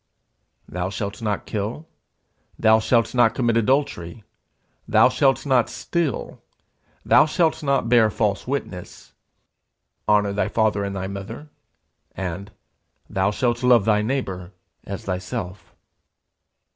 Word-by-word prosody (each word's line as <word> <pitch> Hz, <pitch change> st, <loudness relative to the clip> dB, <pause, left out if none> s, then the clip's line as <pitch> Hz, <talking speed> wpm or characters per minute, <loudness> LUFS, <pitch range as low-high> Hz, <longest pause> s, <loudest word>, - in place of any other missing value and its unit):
'Thou 90 Hz, +1 st, -3 dB
shalt 100 Hz, +3 st, -5 dB
not 105 Hz, -3 st, -2 dB
kill, 110 Hz, +10 st, -4 dB, 0.7 s
Thou 110 Hz, 0 st, +5 dB
shalt 115 Hz, +1 st, +1 dB
not 120 Hz, -2 st, +3 dB
commit 120 Hz, -2 st, +1 dB
adultery, 115 Hz, -, 0 dB, 0.6 s
Thou -, -, +5 dB
shalt 135 Hz, 0 st, +2 dB
not 130 Hz, -4 st, +3 dB
steal, 170 Hz, -8 st, -3 dB, 0.6 s
Thou 155 Hz, -, +6 dB
shalt 160 Hz, 0 st, +1 dB
not 140 Hz, -5 st, +1 dB
bear 115 Hz, -2 st, +5 dB
false 105 Hz, 0 st, -1 dB
witness, 125 Hz, -10 st, -6 dB, 1.0 s
Honour 105 Hz, -1 st, +3 dB
thy 100 Hz, -, 0 dB
father 110 Hz, -3 st, +1 dB
and 100 Hz, 0 st, -4 dB
thy 95 Hz, -1 st, -3 dB
mother; 100 Hz, +10 st, -7 dB, 0.6 s
and, 95 Hz, +2 st, -5 dB, 0.6 s
Thou 95 Hz, +1 st, +1 dB
shalt 120 Hz, +3 st, -1 dB
love 125 Hz, -5 st, +5 dB
thy 105 Hz, -1 st, +3 dB
neighbour 100 Hz, -7 st, -3 dB, 0.3 s
as 100 Hz, -1 st, -6 dB
thyself.' 95 Hz, +1 st, -5 dB
110 Hz, 120 wpm, -23 LUFS, 100-125 Hz, 1.0 s, Thou